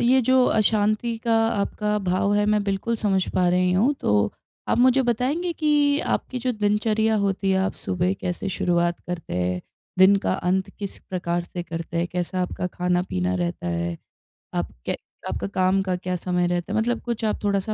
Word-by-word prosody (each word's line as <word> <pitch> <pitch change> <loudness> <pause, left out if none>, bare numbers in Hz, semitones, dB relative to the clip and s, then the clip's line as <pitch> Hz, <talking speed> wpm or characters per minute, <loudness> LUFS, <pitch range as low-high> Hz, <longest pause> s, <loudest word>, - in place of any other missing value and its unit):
ये 255 +2 +4
जो 260 -1 +5
अशांति 215 +2 +2
का 230 - +3
आपका 210 0 -1
भाव 200 +3 +2
है, 210 0 +2
मैं 210 -1 +2
बिल्कुल 200 +4 -1
समझ 195 -3 +1
पा 180 -1 +3
रही 180 0 +2
हूँ 225 +10 +3
तो, 105 0 +2 0.4
आप - - +2
मुझे 255 +2 +5
बताएँगे 265 +9 0
कि 295 -2 +2 0.2
आपकी 255 - -4
जो 250 +1 -1
दिनचर्या 215 +1 +1
होती 195 0 0
है, 190 - +3
आप 190 - 0
सुबह 180 +1 0
कैसे 180 +2 -3
शुरुआत 175 -2 0
करते 175 - -5
हैं? 90 0 -1 0.4
दिन 190 +2 +7
का - - +2
अंत 185 +1 0
किस 200 -2 -5
प्रकार 175 -1 -2
से 175 0 -6
करते 165 0 -6
हैं? 170 +1 +1
कैसा 180 +1 -2
आपका 180 - -3
खाना-पीना 180 - -1
रहता 85 -1 -2
है? 85 0 -2 0.6
आप - - -2
के - - -1 0.3
आपका - - -3
काम 190 0 +2
का 185 -1 -1
क्या 180 0 -3
समय 180 0 0
रहता 175 +3 -2
है? 220 - +2
मतलब 240 +2 0
कुछ 235 -2 -2
आप 215 - -1
थोड़ा-सा 200 +1 0
195 Hz, 185 wpm, -24 LUFS, 175-220 Hz, 0.6 s, दिन